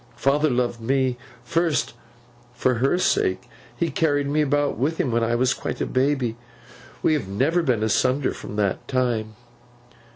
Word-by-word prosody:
Father 140 +5 +2
loved 120 -2 -1
me, 130 +1 +1 0.3
first, 165 -2 0 0.6
for 120 -1 +1
her 135 +6 +3
sake. 95 - +1 0.3
He 165 +2 0
carried 145 -1 +1
me 150 +2 +1
about 145 0 +1
with 155 +6 0
him 130 - 0
when 115 0 +1
I 120 +1 +1
was 125 +1 +2
quite - - -5
a - - 0
baby. 130 -3 0 0.7
We - - +4
have 150 -10 -1
never 135 - +1
been 125 -8 +1
asunder 130 +5 +1
from - - -8
that 100 -3 -1
time. 120 -4 -1
130 Hz, 160 wpm, -23 LUFS, 120-145 Hz, 0.7 s, We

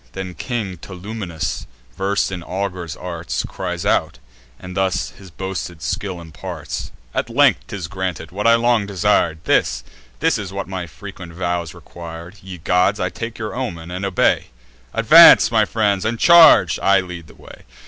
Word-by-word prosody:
Then 95 -1 -6
King 105 -5 -4
Tolumnius, 90 -2 -5 0.3
vers'd 95 0 0
in 90 -2 -5
augurs' 90 -4 -4
arts, 85 -2 -4
Cries - - -5
out, - - +1 0.4
and 90 0 -9
thus 95 -1 0
his 95 -1 -14
boasted 85 -2 -6
skill 95 -4 -3
imparts: 80 -3 -7 0.2
"At - - -2
length 135 +3 +3
'tis 100 -7 -5
granted, 95 -3 -5
what 105 +4 -1
I 115 - +7
long 115 -3 +2
desir'd! 95 -4 +1
This, - - +1 0.4
this - - +1
is 95 -2 -6
what 100 0 -5
my 95 -2 -5
frequent 95 0 -10
vows 85 -2 -3
requir'd. 85 +3 -10
Ye 95 -1 -9
gods, 90 +2 +1
I 90 - 0
take 115 +4 -6
your 110 -1 -5
omen, 90 -10 -5
and 90 +2 -5
obey. 95 -2 +1 0.4
Advance, - - +8
my - - +3
friends, 100 -4 0
and 115 +1 -1
charge! 170 +5 +7
I 100 0 +4
lead 90 -3 -9
the - - -17
way. - - -14
95 Hz, 160 wpm, -20 LUFS, 85-100 Hz, 0.4 s, Advance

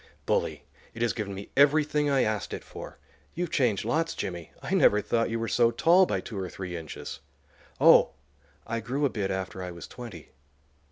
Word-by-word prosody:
"Bully; - - 0 0.3
it 115 - -2
has 120 - +1
given 100 -3 -4
me 100 +1 -9
everything 150 +1 +4
I 135 -2 +3
asked 110 -1 -2
it - - -9
for. - - -10 0.4
You've 175 -1 -2
changed 115 - +1
lots, 165 +7 0
Jimmy. 85 -3 -5
I - - -4
never 105 - +5
thought 115 +3 0
you 115 - -1
were 115 0 -2
so 120 0 +3
tall 170 +10 +4
by - - -1
two 105 -4 -6
or 95 -1 -4
three 90 -2 -6
inches." 80 -3 -7 0.6
"Oh, - - +6 0.5
I 115 - -2
grew 130 +6 -1
a - - +3
bit 100 -5 -2
after 95 0 -4
I 90 - -4
was 85 -1 -8
twenty." 105 - -10
115 Hz, 190 wpm, -28 LUFS, 95-140 Hz, 0.6 s, Oh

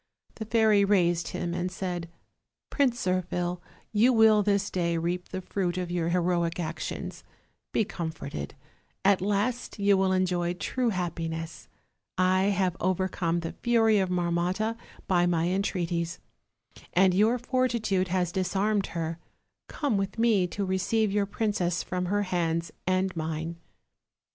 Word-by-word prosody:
The 220 - -6
fairy 220 -2 +4
raised 175 -4 +2
him 175 -1 -3
and 180 +1 -2
said: 180 -2 -4 0.6
"Prince 250 -7 +1
Zirphil, 180 -1 -1 0.3
you 225 +4 +4
will 220 -2 +6
this 200 -1 +1
day 170 -2 0
reap 175 +2 -2
the 185 - -4
fruit 180 -2 -2
of 180 -1 -3
your 170 -1 0
heroic 170 -1 +1
actions. 165 -1 -5 0.5
Be 220 - +2
comforted; 160 - -5 0.5
at 195 -2 +4
last 210 +6 -1
you 200 -1 +4
will 190 0 +2
enjoy 180 -2 +1
true 245 +7 -1
happiness. 165 -4 -4 0.5
I 185 +1 +3
have 190 -3 +1
overcome 180 -2 0
the 165 - -4
fury 225 -3 +4
of 190 -1 0
Marmotta 180 +5 0 0.3
by 175 -2 +3
my 170 -1 +1
entreaties, 175 -3 -1 0.8
and 185 +1 +5
your 215 +6 +3
fortitude 235 -7 0
has 180 -1 0
disarmed 195 +3 0
her; 165 0 -3 0.5
come 280 -9 -1
with 195 +1 -2
me 220 -5 +3
to 200 +3 -3
receive 195 +3 +1
your 200 0 +1
princess 200 -5 -1
from 180 0 -3
her 205 +2 +1
hands 170 -3 -1 0.2
and 185 0 +1
mine." 160 +1 -3
185 Hz, 140 wpm, -28 LUFS, 175-205 Hz, 0.8 s, will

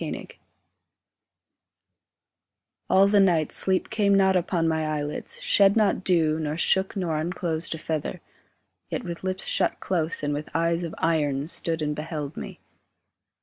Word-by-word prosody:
SAPPHICS - - -7 2.5
All 190 +1 +6
the 205 0 +4
night 170 -6 +3
sleep 190 -1 +1
came 200 -2 +3
not 190 -1 +4
upon 175 -2 +1
my 160 -1 0
eyelids, 150 -1 -4
Shed 200 0 +5
not 210 -3 +2
dew, 160 -4 +2
nor 155 0 -3
shook 190 +3 +2
nor 175 -5 -1
unclosed 170 -1 -2
a - - -7
feather, 155 -1 -3 0.7
Yet - - -3
with 170 0 -6
lips 185 0 -3
shut - - 0
close 165 -4 -2
and 145 0 0
with 150 +1 -5
eyes 165 +1 +1
of 165 -1 -5
iron 145 -3 0
Stood 165 -1 0
and 150 0 -1
beheld 150 -1 -5
me. - - -8
165 Hz, 150 wpm, -25 LUFS, 155-185 Hz, 2.5 s, All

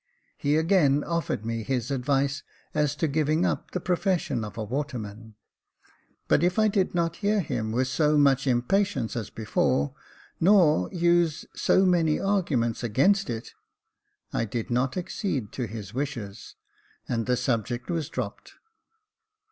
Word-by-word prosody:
He 145 +1 +1
again 160 -4 +3
offered 170 -10 -2
me 115 0 -2
his 125 +2 -2
advice 140 +2 0 0.3
as 150 -2 +1
to 160 - 0
giving 155 +3 +1
up - - -2
the 180 - -3
pro 180 +1 0
fession 165 - -1
of 105 -1 -8
a 110 - -2
waterman; 110 -4 -5 0.9
but - - +3
if 180 +3 +2
I 215 0 +4
did 195 -3 0
not 170 -1 0
hear 210 0 +1
him 110 - -2
with 125 +3 +1
so 150 +3 +2
much 140 -2 +3
impatience 130 - +1
as 115 -4 -4
before, 70 -9 0 0.5
nor 165 - +4
use 170 -2 +2
so 190 - +3
many 170 -4 +3
arguments 160 - 0
against 185 - +2
it, 115 -1 -5 0.8
I - - 0
did 115 +1 -4
not 125 +4 0
accede 170 - -3
to 125 -3 -3
his 105 -1 -8
wishes, 125 -7 -5 0.5
and 115 -1 -2
the 125 -1 +2
subject 120 +3 -2
was 165 -3 -2
dropped. - - -6
140 Hz, 150 wpm, -26 LUFS, 115-170 Hz, 0.9 s, I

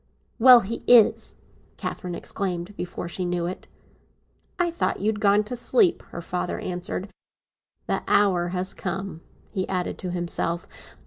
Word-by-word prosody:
"Well, 250 0 +9
he 225 +4 -5
is!" 235 -3 +5 0.4
Catherine 180 -3 -5
exclaimed, 185 +1 -4
before 175 -2 -5
she 180 +2 -4
knew 175 -1 -1
it. 180 +2 -6 0.9
"I 350 -1 +1
thought 340 - -1
you 200 - -4
had 215 -1 -2
gone 205 0 +4
to 215 +4 -5
sleep," 360 - +3
her 170 - -7
father 180 +1 -3
answered. 180 +2 -4 0.8
"The - - -1
hour 185 -4 +3
has 180 +1 -1
come!" 190 -2 -5 0.3
he 190 -3 -2
added 180 -2 -2
to 185 - -4
himself. 175 -1 -1
185 Hz, 145 wpm, -25 LUFS, 175-210 Hz, 0.9 s, Well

